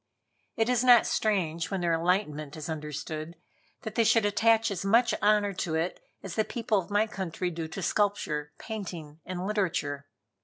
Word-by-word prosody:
It 225 0 +2
is 250 -1 +2
not 245 -2 +7
strange, 170 -6 0
when 195 -2 -2
their 170 -1 +1
enlightenment 165 -4 0
is 155 +2 -6
understood, 155 +1 -5 0.5
that 220 - -5
they 230 - +3
should 225 -1 +4
attach 225 +1 +3
as 190 -3 -3
much 230 +5 +4
honor 205 -1 +3
to 170 -3 -2
it 165 +3 -1 0.2
as 190 - -6
the 220 - +2
people 225 -2 0
of 185 - -7
my 205 +1 +3
country 185 -4 -4
do 165 -1 -4
to 180 +4 -6
sculpture, 165 -9 0
painting 175 -8 -7
and 185 0 -4
literature. 160 -9 -1
190 Hz, 170 wpm, -28 LUFS, 160-215 Hz, 0.5 s, not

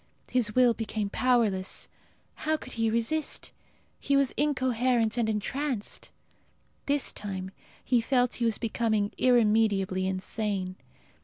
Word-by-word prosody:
His 230 -4 +1
will 250 -2 +5
became 215 -3 -3
powerless. 225 -7 +1 0.5
How 315 0 -1
could - - -8
he 225 -1 +1
resist? 235 +8 0 0.5
He 280 - +1
was 275 -2 +3
incoherent 250 -5 +1
and 235 -3 0
entranced. 235 +2 -3 0.8
This 285 0 +1
time 190 -2 -5 0.3
he 245 -2 +3
felt 245 0 +1
he - - +3
was 225 -2 +1
becoming 220 -2 0
irremediably 210 -6 +3
insane. 190 0 -2
230 Hz, 115 wpm, -28 LUFS, 205-255 Hz, 0.8 s, will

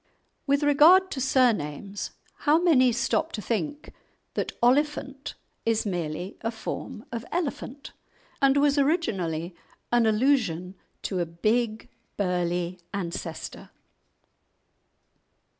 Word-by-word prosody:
With 280 +1 +2
regard 330 +7 +6
to 265 - -3
surnames, 205 - +1 0.3
how 300 +1 +3
many 300 -8 +5
stop 270 +7 0
to - - -3
think 290 - -3 0.4
that - - -2
"Oliphant" 275 +2 +1 0.3
is 225 -1 +1
merely 175 -1 -3
a 225 - -1
form 225 0 -6
of 235 -2 -4
"elephant," 285 -5 -4 0.5
and 275 0 +5
was 285 0 +3
originally 185 - 0 0.4
an 240 -2 +4
allusion 215 - +1 0.3
to 190 - -2
a 175 - 0
big, 215 +6 0 0.3
burly 180 -2 -1
ancestor? 170 -3 -5
230 Hz, 105 wpm, -26 LUFS, 180-280 Hz, 0.5 s, regard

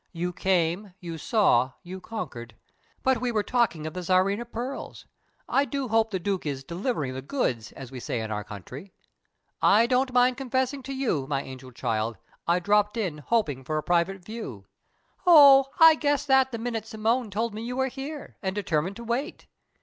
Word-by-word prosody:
"You 175 +1 -3
came, 180 +1 0
you 165 -2 -7
saw, 135 - +3
you 185 +1 -8
conquered. 120 - -7 0.5
But 260 -3 +2
we 250 -1 0
were 215 -2 0
talking 230 -12 0
of 155 - -5
the 185 - -5
Tsarina 190 +5 +2
pearls. 240 +3 -6 0.4
I 275 - +3
do 275 -1 -3
hope 225 0 +3
the 195 - -2
Duke 190 +1 -2
is 140 -3 -4
'delivering 170 - -3
the 130 - -5
goods', 130 - -2
as 135 -2 -10
we 130 - -7
say 120 - -3
in 110 -1 -4
our 105 -1 -2
country. 125 - -10 0.7
I 220 +3 +5
don't 255 +2 +1
mind 250 0 +3
confessing 260 +1 -1
to - - -2
you, 200 - -1
my 140 -1 -1
angel 130 -1 -10
child, 110 -2 -2 0.3
I 170 +1 +4
dropped 210 +4 +2
in 180 -9 -2
hoping 145 - 0
for 155 +4 -2
a 155 - -2
private 175 +1 0
view." 200 - -7 0.6
"Oh, 280 -5 +9
I 325 -1 +9
guessed 290 -2 0
that 265 -1 +4
the 230 - -3
minute 225 -1 -4
Simone 225 +2 0
told 220 +3 -2
me 215 - -6
you 245 +2 -4
were 265 - +2
here, 275 +3 -7
and 190 -1 -2
determined 185 -2 -1
to 235 - -8
wait!" 245 +8 -3
205 Hz, 190 wpm, -26 LUFS, 155-245 Hz, 0.7 s, Oh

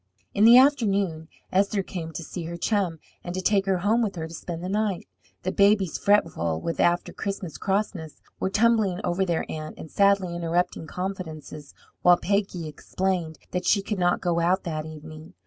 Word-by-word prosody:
In 205 - +4
the 235 +2 +9
afternoon 200 - +3 0.2
Esther 195 +1 +2
came 165 -3 -6
to 170 - -5
see 170 +2 -6
her 170 +1 -5
chum, 185 -3 0 0.3
and 175 0 -5
to - - -1
take 195 +1 +2
her 190 -1 +2
home 210 +6 +2
with 210 -4 -1
her 160 -2 -4
to 165 - -11
spend 170 0 -6
the - - -3
night. 205 -1 -1 0.4
The 185 - -1
babies, 200 -4 +3
fretful 85 - +2
with 165 - -4
after 175 0 +2
Christmas 195 -5 -5
crossness, 195 -6 -2 0.2
were - - 0
tumbling 215 -3 +2
over 180 +2 0
their 170 -3 -1
aunt, 155 0 -6
and 160 - -10
sadly 200 -3 +3
interrupting 170 -1 -1
confidences, 160 -5 -6 0.3
while 175 0 +6
Peggy 190 -4 -1
explained 175 +1 -2
that 180 0 -2
she 200 -2 +3
could 205 -1 -3
not 175 0 +2
go 170 -2 +1
out 180 +3 +2
that 155 -2 -4
evening. 155 +2 -11
180 Hz, 180 wpm, -25 LUFS, 165-200 Hz, 0.4 s, the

